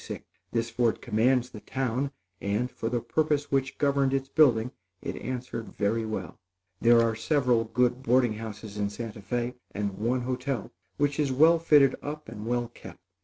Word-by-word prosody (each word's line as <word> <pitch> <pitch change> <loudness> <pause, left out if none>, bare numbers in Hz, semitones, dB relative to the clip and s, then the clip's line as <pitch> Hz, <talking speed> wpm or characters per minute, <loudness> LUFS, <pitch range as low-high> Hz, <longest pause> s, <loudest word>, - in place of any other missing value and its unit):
This 115 0 -1
fort 115 -1 +1
commands 125 +3 +2
the 105 - -8
town; 130 +3 -2 0.3
and, 105 +5 -1
for 115 - -3
the 120 -1 -1
purpose 150 +4 0
which 135 -1 0
governed 140 -1 +2
its 135 0 -2
building 125 -6 +4 0.3
it - - -5
answered 125 -3 -5
very 110 +2 0
well. 95 -7 -5 0.4
There 120 0 +6
are 115 -1 +1
several 120 -1 +2
good 125 +2 +1
boarding 125 -2 +3
houses 110 -1 -7
in 100 -1 0
Santa 110 0 -7
Fé, 120 +4 -2 0.2
and 100 -1 -3
one 120 +4 +1
hotel, 125 -2 -3 0.3
which 145 0 +1
is 145 -3 +2
well 160 +5 +5
fitted 145 -5 +5
up 150 +1 -6
and 105 +2 -7
well 120 -1 0
kept. - - -12
125 Hz, 170 wpm, -28 LUFS, 115-135 Hz, 0.4 s, There